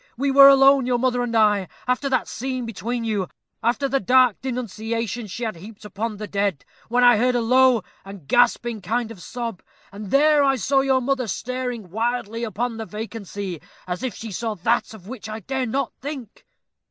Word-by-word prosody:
We 275 +2 +1
were 275 0 +9
alone, 275 -1 +6
your 250 -1 +2
mother 250 0 +1
and 240 -1 -2
I, 210 -4 +3 0.2
after 255 +3 0
that 255 -2 0
scene 255 0 -4
between 230 +2 -4
you; 210 -5 -1 0.3
after 240 +4 +1
the 275 +1 +1
dark 250 +2 +3
denunciations 230 -2 -4
she 240 +6 -6
had 220 -6 -3
heaped 210 +4 -12
upon 210 +2 -4
the 210 - -5
dead, 200 -7 -2 0.2
when 245 +1 +2
I 245 -2 +7
heard 250 +3 +2
a - - +2
low 250 -1 +4 0.2
and 195 -7 -11
gasping 240 - +2
kind 230 +4 -2
of 200 -6 -11
sob, 235 -4 -5 0.3
and 200 0 -8
there 295 +3 +4
I 270 -1 +3
saw 270 +4 +1
your 265 -1 +2
mother 260 -1 -1
staring 245 -3 -4
wildly 230 +1 -2
upon 230 +2 -3
the 225 - -5
vacancy, 205 -5 -6 0.2
as 180 0 -4
if 260 -3 -3
she 225 -1 -7
saw 220 +2 -3
that 225 +4 0
of 190 -3 -14
which 225 -2 -8
I 215 +1 -6
dare 265 +4 -2
not 270 +3 -2
think." 270 -6 -8
235 Hz, 190 wpm, -23 LUFS, 210-255 Hz, 0.3 s, were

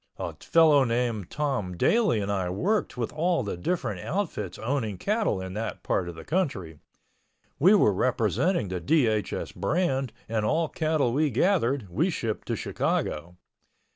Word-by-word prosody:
A - - -4
fellow 155 -4 +5
named 115 -5 -1
Tom 130 -12 -2
Daly 215 - +3
and 100 0 -2
I 95 -3 -1
worked 185 - -1
with 120 -2 -3
all 165 -1 +1
the 100 - -3
different 165 - -2
outfits 105 - -3
owning 110 -5 -2
cattle 210 - 0
in 95 0 -6
that 110 +3 -4
part 90 -2 0
of 85 - -8
the 80 - -10
country. 105 - -2 0.8
We 185 +8 +6
were 105 - +4
representing 120 - +1
the 90 -1 -3
DHS 110 - +1
brand 135 - 0 0.2
and 110 -1 -1
all 155 +8 +1
cattle 155 -6 0
we 150 +3 +2
gathered 135 - +1
we 165 - +1
shipped 115 - -3
to - - -1
Chicago. 85 +4 -2
125 Hz, 155 wpm, -27 LUFS, 100-160 Hz, 0.8 s, We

